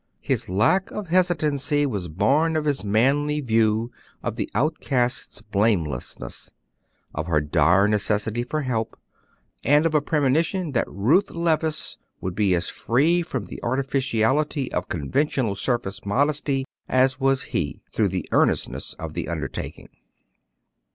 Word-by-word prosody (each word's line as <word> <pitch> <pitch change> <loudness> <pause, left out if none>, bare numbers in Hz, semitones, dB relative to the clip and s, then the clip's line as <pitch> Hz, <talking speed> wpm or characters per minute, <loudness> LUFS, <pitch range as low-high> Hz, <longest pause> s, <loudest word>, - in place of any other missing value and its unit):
His - - -1
lack 110 - +2
of 210 -5 -6
hesitancy 150 -5 +2
was 100 -10 -3
born 135 - +2
of 155 -1 0
his 145 -6 0
manly 140 +8 +2
view 115 -2 +1 0.3
of - - -2
the - - -3
outcast's 130 -2 -1
blamelessness, 100 - -1 0.6
of 75 +2 -3
her 80 -3 +3
dire 85 +6 +3
necessity 105 +2 0
for 150 +6 -2
help, 115 -4 -2 0.7
and 150 +3 +4
of 165 - +1
a 150 - +4
premonition 155 +4 +1
that 120 - 0
Ruth 140 - +2
Levice 160 -2 -1 0.2
would 95 - -4
be 100 -2 +2
as 85 0 -1
free 155 +9 +2
from 130 -10 -4
the - - -9
artificiality 135 +1 0
of - - -2
conventional 115 - 0
surface 100 -2 -2
modesty 140 +4 0 0.2
as 130 0 +3
was 135 0 +2
he, 75 -4 -2
through 105 -3 +2
the 90 -3 -3
earnestness - - +1
of - - -6
the - - -4
undertaking. - - -5
130 Hz, 135 wpm, -24 LUFS, 105-150 Hz, 0.7 s, and